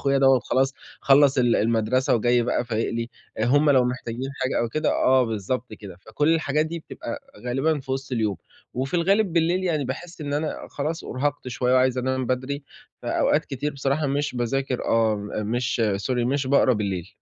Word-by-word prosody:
أخويا 140 Hz, 0 st, +2 dB
دَوّة 135 Hz, -1 st, +5 dB
خلاص 135 Hz, +3 st, 0 dB, 0.3 s
خلّص 140 Hz, -1 st, +5 dB
ال 120 Hz, -1 st, +3 dB
المدرسة 115 Hz, +4 st, +2 dB
وجاي 120 Hz, +1 st, +3 dB
بقى 120 Hz, 0 st, 0 dB
فايق 115 Hz, -1 st, -1 dB
لي، 115 Hz, 0 st, -3 dB, 0.3 s
هُم 145 Hz, +5 st, +4 dB
لو 130 Hz, -3 st, +5 dB
محتاجين 125 Hz, +1 st, -4 dB
حاجة 130 Hz, -, 0 dB
أو 120 Hz, -, 0 dB
كده، 155 Hz, +6 st, 0 dB
آه 130 Hz, -1 st, +3 dB
بالضبط 115 Hz, +3 st, -3 dB
كده، 100 Hz, -4 st, -10 dB
فكلّ 145 Hz, +10 st, -1 dB
الحاجات 155 Hz, -1 st, +1 dB
دي 170 Hz, +1 st, -5 dB
بتبقى 295 Hz, -, -7 dB, 0.3 s
غالبًا 140 Hz, +4 st, +1 dB
في 130 Hz, 0 st, -5 dB
وِسط 135 Hz, 0 st, -4 dB
اليوم. 110 Hz, -5 st, 0 dB, 0.4 s
وفي 135 Hz, +6 st, -3 dB
الغالب 195 Hz, +3 st, +2 dB
بالليل 175 Hz, +2 st, +1 dB
يعني 155 Hz, -6 st, 0 dB
باحس 165 Hz, +7 st, -6 dB
إن 145 Hz, -1 st, -4 dB
أنا 150 Hz, +2 st, -3 dB
خلاص 155 Hz, +4 st, -3 dB
أُرهقت 145 Hz, 0 st, -2 dB
شوية 125 Hz, +1 st, 0 dB
وعايز 130 Hz, 0 st, +3 dB
انام 130 Hz, 0 st, -1 dB
بدري، 130 Hz, +3 st, -2 dB, 0.4 s
فأوقات -, -, +1 dB
كتير 145 Hz, +3 st, -3 dB
بصراحة 140 Hz, +2 st, -1 dB
مش 140 Hz, 0 st, -1 dB
باذاكر 125 Hz, +1 st, -1 dB
آه، 115 Hz, -1 st, +2 dB
م 105 Hz, +1 st, -4 dB
مش 120 Hz, 0 st, 0 dB, 0.3 s
Sorry، 125 Hz, -2 st, +1 dB
مش 135 Hz, +1 st, 0 dB
باقرا 130 Hz, -1 st, +4 dB
بالليل. 95 Hz, -4 st, -3 dB
130 Hz, 180 wpm, -24 LUFS, 120-145 Hz, 0.4 s, دَوّة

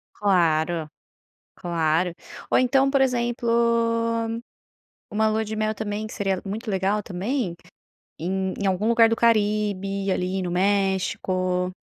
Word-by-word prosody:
Claro, 165 Hz, -5 st, +1 dB, 0.7 s
claro. 170 Hz, 0 st, 0 dB, 0.4 s
Ou -, -, +4 dB
então, 270 Hz, +2 st, +3 dB
por 275 Hz, -, +2 dB
exemplo, 240 Hz, -2 st, 0 dB, 1.6 s
uma 220 Hz, +1 st, +2 dB
lua 220 Hz, +1 st, 0 dB
de 215 Hz, +1 st, -5 dB
mel 215 Hz, 0 st, 0 dB
também, 210 Hz, 0 st, -4 dB
que -, -, -9 dB
seria 195 Hz, -3 st, -1 dB
muito 215 Hz, +3 st, -4 dB
legal 195 Hz, +2 st, 0 dB
também, 195 Hz, 0 st, -3 dB, 0.6 s
em 190 Hz, +2 st, -2 dB
em 200 Hz, -, 0 dB
algum 195 Hz, +4 st, +1 dB
lugar 230 Hz, -1 st, +5 dB
do 225 Hz, -, 0 dB
Caribe, 205 Hz, -3 st, +1 dB
ali 185 Hz, +1 st, -1 dB
no 180 Hz, -, -3 dB
México, 185 Hz, -1 st, 0 dB
200 Hz, 125 wpm, -24 LUFS, 185-220 Hz, 1.6 s, lugar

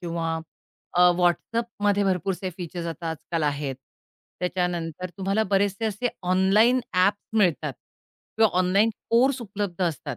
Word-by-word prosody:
किंवा 165 Hz, -1 st, -2 dB, 0.6 s
अ, -, -, +4 dB, 0.2 s
WhatsAppमध्ये 205 Hz, +3 st, +1 dB
भरपूरसे 190 Hz, 0 st, -1 dB
फीचर्स 175 Hz, -1 st, -5 dB
आता 165 Hz, 0 st, -5 dB
आजकाल 160 Hz, +1 st, -4 dB
आहेत. 145 Hz, -2 st, -1 dB, 0.7 s
त्याच्यानंतर 180 Hz, -1 st, -2 dB
तुम्हाला 195 Hz, +3 st, +1 dB
बरेचसे 200 Hz, +2 st, +1 dB
असे 220 Hz, +3 st, -1 dB, 0.2 s
ऑनलाईन 210 Hz, +7 st, +4 dB
ॲप 185 Hz, +3 st, +4 dB, 0.2 s
मिळतात 180 Hz, -9 st, +2 dB, 0.6 s
किंवा 220 Hz, -1 st, +5 dB
ऑनलाईन 195 Hz, +5 st, +3 dB, 0.2 s
कोर्स 255 Hz, +3 st, +3 dB
उपलब्ध 200 Hz, -4 st, -4 dB
असतात, 145 Hz, -5 st, -3 dB
185 Hz, 120 wpm, -25 LUFS, 170-205 Hz, 0.7 s, किंवा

